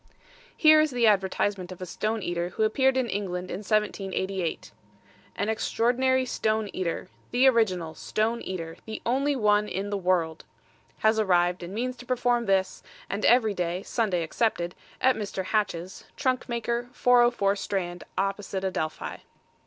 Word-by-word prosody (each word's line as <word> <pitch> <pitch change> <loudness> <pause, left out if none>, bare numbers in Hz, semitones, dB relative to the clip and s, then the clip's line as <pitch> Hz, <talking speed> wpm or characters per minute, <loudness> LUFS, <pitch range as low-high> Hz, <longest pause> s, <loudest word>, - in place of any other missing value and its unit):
Here 310 -1 +7
is 310 - +2
the 245 -3 +1
advertisement 195 -2 +1
of 185 - -9
a 185 - -5
stone 215 +4 -2
eater 175 0 -2
who 220 - -1
appeared 260 +4 +3
in 255 -2 +1
England 185 -3 -3
in 180 - -3
1788. 195 -4 -2 0.6
An - - -1
Extraordinary 250 +4 +1
Stone 220 -3 -1
Eater 180 -1 -3 0.2
The 245 +2 +3
Original 185 -10 +2
STONE 225 +6 -1
EATER 165 -3 -5
The 220 - -5
Only 275 +4 +1
One 210 -3 +3
in 200 +2 -3
the 200 - -1
World, 175 -3 0 0.6
Has 220 0 +4
arrived, 180 -3 +2
and 175 +3 -7
means 250 +2 -2
to 250 - -12
perform 245 -2 +1
this, 190 -1 +1 0.3
and 200 +2 -3
every 230 -3 +5
day 180 0 -2
(Sunday 200 -8 0
excepted) 175 -1 -1 0.3
at 260 0 +4
Mr. 200 -2 -4
Hatch's, 185 -3 -2
trunk 255 -3 0
maker, 235 +1 -2
404 240 -6 +4
Strand, 180 -3 -3
opposite 195 0 -2
Adelphi. 160 -5 -3
205 Hz, 150 wpm, -27 LUFS, 185-235 Hz, 0.6 s, Here